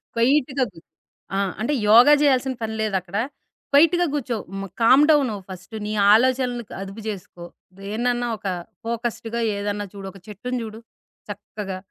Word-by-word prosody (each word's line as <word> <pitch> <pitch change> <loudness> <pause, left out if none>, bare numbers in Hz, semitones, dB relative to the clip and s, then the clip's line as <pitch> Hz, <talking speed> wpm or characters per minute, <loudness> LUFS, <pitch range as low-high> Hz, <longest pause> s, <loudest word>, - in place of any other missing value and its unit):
క్వైట్‌గా 265 +3 +2
గూర్చో. 165 - -17 0.5
ఆ! - - +1 0.2
అంటే 265 +6 0 0.2
యోగా 240 +7 +8
జేయాల్సిన 265 -2 +3
పని 220 0 -3
లేదక్కడ. 195 -3 -2 0.6
క్వైట్‌గా 335 +5 +5
గూర్చో. 250 -5 -2 0.2
మ 195 - -4 0.2
కామ్ 260 +6 +7
డౌన్ 285 -5 +4
అవ్వు 200 -2 -7
ఫస్ట్ 185 +4 -9
నీ 210 - -3 0.2
ఆలోచనలుకు 245 0 +1
అదుపు 195 +3 -7
జేసుకో. 180 -4 -7 0.3
దేన్నన్నా 240 +4 -1
ఒక 200 - -6 0.4
ఫోకస్డ్‌గా 235 0 -3 0.2
ఏదన్నా 205 0 -2
చూడు. 195 -1 -8
ఒక 195 - -14
చెట్టుని 245 +5 -4
జూడు. 220 0 -8 0.5
చక్కగా, 205 -1 -6
230 Hz, 140 wpm, -23 LUFS, 205-255 Hz, 0.6 s, యోగా